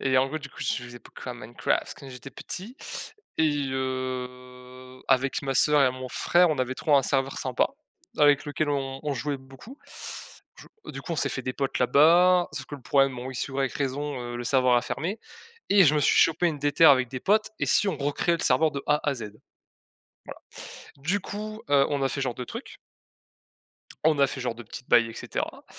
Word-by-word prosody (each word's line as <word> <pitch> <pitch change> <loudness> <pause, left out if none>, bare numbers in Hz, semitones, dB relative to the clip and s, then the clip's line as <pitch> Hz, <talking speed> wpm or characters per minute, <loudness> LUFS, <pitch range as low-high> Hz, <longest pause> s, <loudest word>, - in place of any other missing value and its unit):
Et 130 -1 +2
en 130 - +3
gros 155 - -4
du 140 -2 -9
coup - - -21
je 125 -1 -1
jouais 120 0 -10
beaucoup 130 - -12
à 125 - -6
Minecraft 120 0 -2
quand 140 - -11
j'étais 130 +1 -10
petit 215 - -8 0.6
et 145 -3 +2
heu, 130 -1 -6
avec 135 +1 +2
ma 135 -1 -2
sœur 150 +1 +4
et 130 - +3
mon 130 0 -7
frère 175 +8 +3
on 150 - -1
avait 130 0 -1
trouvé 150 +1 +2
un 135 - +4
serveur 135 +1 0
sympa 130 -1 0 0.5
avec 145 -1 +5
lequel 150 +1 -2
on 135 -2 -2
on 150 -2 -2
jouait 140 +3 -2
beaucoup. 135 - -14 0.8
Du - - -13 0.3
du - - -7
coup 170 - -5
on - - -2
s'est - - +2
fait 130 - -4
des 130 - -3
potes 135 -1 -2
là-bas, 175 +7 +5
sauf 135 -3 -3
que - - -8
le 140 - -11
problème 135 +1 +2
bon 125 +2 -6
X 130 +1 -4
ou 135 +1 -3
Y 135 -1 0
raison, 140 0 -3
heu, 120 0 -5
le 120 - -5
serveur 130 0 +3
a 120 - +2
fermé 165 - -3 0.5
et 200 -2 +7
je 150 - +4
me 150 - +2
suis 140 - +3
chopé 165 +2 +4
une 150 - -4
déterre 145 +3 +5
avec 130 -2 +3
des 130 +1 -6
potes: 215 +2 +2
«Et - - +1
si 205 - +3
on 180 - -1
recréait 145 +4 0
le - - -4
serveur 155 +5 +3
de 140 - -4
A 150 0 +2
à 145 - +2
Z?» 120 - -7
Voilà. - - -20 1.6
Du 175 +9 0
coup 215 +3 -7
heu, 140 -1 +5
on 145 - 0
a 135 - +2
fait - - -4
ce 140 - -2
genre 125 -3 -2
de 125 - -6
trucs - - -9 1.3
on 155 -2 +3
a 140 - +5
fait 135 - -6
genre 125 -2 -2
de 120 - -10
petites 120 +3 -11
bail 120 -1 +5
et 115 - -8
cetera - - -5
135 Hz, 225 wpm, -26 LUFS, 130-150 Hz, 1.6 s, et